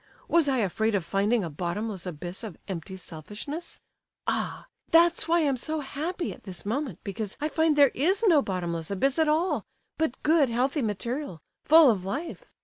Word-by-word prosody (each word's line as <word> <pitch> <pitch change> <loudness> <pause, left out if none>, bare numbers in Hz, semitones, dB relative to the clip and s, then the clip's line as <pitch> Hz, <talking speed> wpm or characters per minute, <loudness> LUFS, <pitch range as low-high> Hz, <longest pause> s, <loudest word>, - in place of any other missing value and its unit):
Was 335 -3 +3
I 265 - +2
afraid 220 +1 +1
of 185 -4 -1
finding 205 +4 +1
a 170 - -3
bottomless 185 +4 -3
abyss 175 +4 -6
of 210 -7 -7
empty 190 0 -5
selfishness? 210 - -7 0.4
Ah! - - -2 0.2
that's 340 +1 +4
why 340 +1 +3
I - - +2
am 275 -3 +1
so 310 +5 -3
happy 325 +6 -3
at - - -15
this 190 -2 -8
moment, 240 - -2
because 205 0 -4
I 300 - 0
find 320 -1 +2
there 285 -3 +6
is 375 - +1
no 330 -8 +6
bottomless 170 -6 -3
abyss 265 - +1
at 320 - +4
all—but 320 -3 -2
good, 305 -4 +4
healthy 260 +5 0
material, 235 - -3 0.3
full 315 -4 +8
of 195 -5 -2
life. 295 - -5
245 Hz, 175 wpm, -27 LUFS, 195-310 Hz, 0.4 s, full